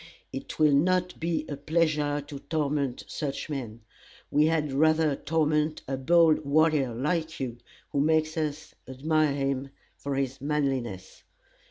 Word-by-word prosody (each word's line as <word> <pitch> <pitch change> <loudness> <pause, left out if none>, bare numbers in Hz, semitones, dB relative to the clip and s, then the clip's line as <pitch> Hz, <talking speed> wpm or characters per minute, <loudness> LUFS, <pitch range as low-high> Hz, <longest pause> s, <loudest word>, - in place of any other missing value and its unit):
It 135 - -6
will 155 -1 +5
not 180 +5 +2
be 165 -2 -1
a 145 - -4
pleasure 150 -1 +1
to 145 -1 -8
torment 145 -4 -1
such 150 0 -4
men. 120 -5 -5 0.5
We 150 +1 +4
had 155 -3 0
rather 155 +1 +3
torment 155 +1 0
a 135 - -1
bold 160 +3 +4
warrior, 145 -4 +2
like 160 +5 -1
you, 120 -3 -4 0.3
who 140 - 0
makes 155 +1 +2
us 155 -1 -3
admire 150 +2 +1
him 135 -1 -1 0.3
for 140 -1 -3
his 135 0 -2
manliness. 135 -9 -2
150 Hz, 140 wpm, -27 LUFS, 135-155 Hz, 0.5 s, will